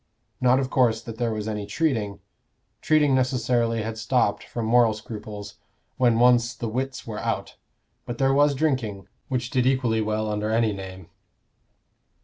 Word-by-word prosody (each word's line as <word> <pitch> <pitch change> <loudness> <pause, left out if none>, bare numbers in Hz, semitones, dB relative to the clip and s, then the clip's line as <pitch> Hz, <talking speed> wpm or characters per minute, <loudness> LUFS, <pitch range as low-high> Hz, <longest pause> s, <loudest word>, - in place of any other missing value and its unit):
Not, 125 0 +4
of 130 -1 -2
course, 120 -4 +3
that 115 -1 -8
there 120 -2 0
was 110 -1 -4
any 105 -2 -3
treating: 115 -11 -1 0.6
treating 150 -3 +3
necessarily 120 -3 +1
had 110 0 -5
stopped, 115 -2 +1
from 115 -2 -5
moral 115 -1 +4
scruples, 105 -1 -8 0.4
when 120 -3 +3
once 120 0 +4
"the 120 - -4
writs 130 +4 -3
were 110 -2 -5
out;" - - -3 0.5
but 120 - -4
there 135 +1 +2
was 145 0 +4
drinking, 125 -10 -1 0.2
which 125 -3 -2
did 125 -1 +2
equally 125 -4 +1
well 110 0 -1
under 105 0 -2
any 110 -1 +2
name. 95 -3 -9
115 Hz, 155 wpm, -25 LUFS, 110-130 Hz, 0.6 s, Not